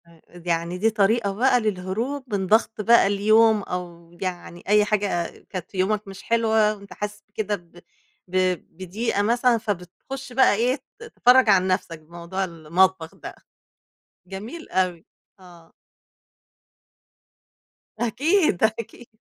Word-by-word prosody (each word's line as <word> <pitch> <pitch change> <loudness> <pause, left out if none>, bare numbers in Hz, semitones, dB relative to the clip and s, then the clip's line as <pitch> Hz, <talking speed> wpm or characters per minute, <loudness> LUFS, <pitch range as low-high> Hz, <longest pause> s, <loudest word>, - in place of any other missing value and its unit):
امم، 165 -1 -21
يعني 170 0 -3
دي 220 +4 +2
طريقة 215 0 +1
بقى 250 +4 +3
للهروب 215 +6 -3
من 190 -1 -2
ضغط 220 +1 +2
بقى 230 0 +5
اليوم 215 +2 +4
أو 175 -2 -7
يعني 175 -2 -5
أي 210 +1 +4
حاجة 205 -4 0 0.3
كانت 185 -2 -6
في 195 - -9
يومك 205 +2 0
مش 195 0 -10
حلوة، 220 -2 +2
وأنت 200 -1 -13
حاسس 210 0 -6
بكده 210 0 -2
ب 175 -2 -16 0.5
ب 185 +1 -2 0.4
بضيقة 200 +4 -2
مثلًا، 235 +3 +2
فبتخش 220 +6 -6
بقى 260 -2 +5
إيه 245 +4 +1 0.2
ت - - -10
تفرَج 255 - +4
عن 190 -2 +4
نفسك 180 -3 -2
بموضوع 170 +4 -5
المطبخ 170 0 0
ده، - - -9 0.9
جميل 215 - -8
أوي، 180 -3 -1 0.3
آه. 175 -3 -17 2.3
أكيد، 290 - +1
أكيد. 230 +2 -2
200 Hz, 130 wpm, -23 LUFS, 180-225 Hz, 2.3 s, بقى